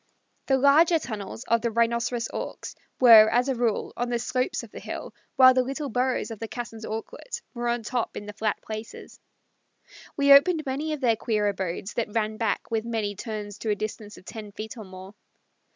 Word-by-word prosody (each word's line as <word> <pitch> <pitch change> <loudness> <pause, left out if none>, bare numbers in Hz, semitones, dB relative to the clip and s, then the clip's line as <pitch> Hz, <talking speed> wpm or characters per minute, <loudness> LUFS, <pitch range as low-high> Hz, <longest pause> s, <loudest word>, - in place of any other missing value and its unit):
The 270 - +3
larger 305 +5 +5
tunnels 215 -5 -6
of 230 0 +1
the 235 - 0
Rhinoceros 235 +1 0
Auks - - -5 0.3
were, 225 -4 +9
as 245 +3 +2
a 270 - +1
rule, 235 -3 -1
on 245 0 -2
the 240 - 0
slopes 255 +2 -1
of - - -12
the - - -8
hill, - - -7 0.2
while 260 -1 +8
the 255 - +3
little 275 +3 -4
burrows 250 0 -1
of 220 - -7
the 225 - -4
Cassin's 225 -2 -7
Auklet 225 - -6
were 240 -1 -3
on 235 -1 0
top 240 +1 -2
in 205 - -6
the 210 - -8
flat 215 0 -1
places. 215 +1 -8 1.0
We 280 -1 +7
opened 310 +3 +5
many 290 +4 -2
of 300 - -5
their 235 -3 +3
queer 210 -2 0
abodes 190 0 -4
that 225 -3 -2
ran 215 -1 0
back 225 0 -2
with 220 -1 0
many 225 -3 -2
turns 210 -1 -6
to 220 - -3
a 210 - +2
distance 215 0 -6
of - - -16
ten 215 -1 -8
feet 220 +5 -7
or 220 -3 -9
more. 185 +1 -11
230 Hz, 200 wpm, -26 LUFS, 215-255 Hz, 1.0 s, were